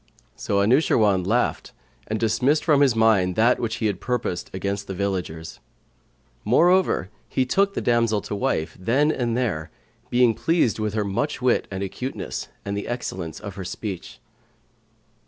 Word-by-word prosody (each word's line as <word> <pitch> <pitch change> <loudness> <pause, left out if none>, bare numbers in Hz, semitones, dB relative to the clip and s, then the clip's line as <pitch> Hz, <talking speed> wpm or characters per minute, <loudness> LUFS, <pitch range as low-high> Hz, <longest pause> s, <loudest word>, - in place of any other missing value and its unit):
So 100 0 0
Anushirwan 105 - +3
laughed 120 +4 0 0.3
and 110 0 -2
dismissed 125 +7 +2
from 150 -4 +4
his 135 -5 +4
mind 105 -5 +3
that 115 +3 +3
which 110 -1 -2
he 110 - -3
had 100 -4 -1
purposed 120 -8 -2
against 100 +1 -3
the 95 - -5
villagers. 90 -4 -3 0.8
Moreover, 175 - +3 0.2
he 130 - +1
took 200 +9 +1
the - - -1
damsel 115 -3 +2
to - - -6
wife 80 -5 -1
then 135 +10 +2
and 120 -5 -1
there, 90 -12 -1 0.4
being 120 -1 +4
pleased 160 -5 +1
with 105 -1 -2
her 105 -1 0
much 115 +11 -2
wit 125 -1 +1
and 95 0 -4
acuteness 125 +7 -5 0.2
and 100 0 -3
the 100 - -4
excellence 95 -9 -4
of 100 -2 -7
her 95 - -4
speech. 95 0 -6
110 Hz, 155 wpm, -24 LUFS, 100-125 Hz, 0.8 s, from